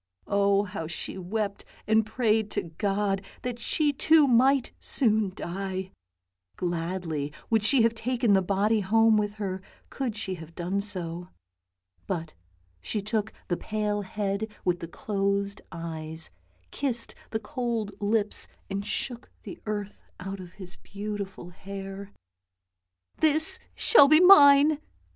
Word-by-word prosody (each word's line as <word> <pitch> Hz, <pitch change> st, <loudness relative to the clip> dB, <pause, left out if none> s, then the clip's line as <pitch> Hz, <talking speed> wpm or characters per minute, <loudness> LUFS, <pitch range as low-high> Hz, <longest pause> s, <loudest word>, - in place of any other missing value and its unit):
Oh 200 Hz, 0 st, +3 dB
how 185 Hz, -5 st, -5 dB
she 165 Hz, -, -4 dB
wept 200 Hz, +2 st, -3 dB, 0.2 s
and 220 Hz, +1 st, +4 dB
prayed 220 Hz, -1 st, +1 dB
to -, -, +1 dB
God, 195 Hz, +3 st, -1 dB, 0.2 s
that 245 Hz, -1 st, -4 dB
she 295 Hz, +3 st, +1 dB
too 315 Hz, +2 st, +5 dB
might 260 Hz, +2 st, +4 dB
soon 220 Hz, -6 st, +1 dB
die. 190 Hz, +1 st, -4 dB, 0.6 s
Gladly 170 Hz, -4 st, -3 dB, 0.2 s
would 220 Hz, -2 st, +3 dB
she 235 Hz, +2 st, +5 dB
have 230 Hz, 0 st, +3 dB
taken 235 Hz, -1 st, +1 dB
the 190 Hz, -, +5 dB
body 200 Hz, +4 st, +2 dB
home 225 Hz, +3 st, +4 dB
with 205 Hz, -1 st, 0 dB
her 195 Hz, -3 st, -4 dB, 0.3 s
could 255 Hz, -6 st, -3 dB
she 200 Hz, -3 st, -3 dB
have 160 Hz, +1 st, -12 dB
done 185 Hz, +3 st, -1 dB
so. 175 Hz, -4 st, -3 dB, 0.8 s
But 165 Hz, -5 st, -3 dB, 0.5 s
she 210 Hz, -, -2 dB
took 215 Hz, +1 st, -2 dB, 0.2 s
the 175 Hz, -, 0 dB
pale 210 Hz, -1 st, -2 dB
head 200 Hz, +1 st, -2 dB, 0.2 s
with 175 Hz, -1 st, +1 dB
the 165 Hz, -, -6 dB
closed 200 Hz, +1 st, -2 dB
eyes, 160 Hz, -1 st, -4 dB, 0.4 s
kissed 245 Hz, -5 st, -2 dB, 0.2 s
the 220 Hz, -, -2 dB
cold 235 Hz, -3 st, -3 dB
lips 210 Hz, 0 st, +1 dB, 0.2 s
and 200 Hz, +1 st, -2 dB
shook 240 Hz, +3 st, -3 dB
the 345 Hz, -, -9 dB
earth 205 Hz, -1 st, -4 dB, 0.2 s
out 195 Hz, +2 st, -6 dB
of 180 Hz, -1 st, -10 dB
his 185 Hz, -2 st, -9 dB
beautiful 200 Hz, -3 st, -6 dB
hair. 195 Hz, +2 st, -8 dB, 0.5 s
" 90 Hz, 0 st, -59 dB, 0.3 s
This 315 Hz, 0 st, +3 dB, 0.2 s
shall 285 Hz, -, +7 dB
be 310 Hz, +2 st, +7 dB
mine! 295 Hz, -5 st, +8 dB
205 Hz, 135 wpm, -27 LUFS, 185-225 Hz, 0.8 s, mine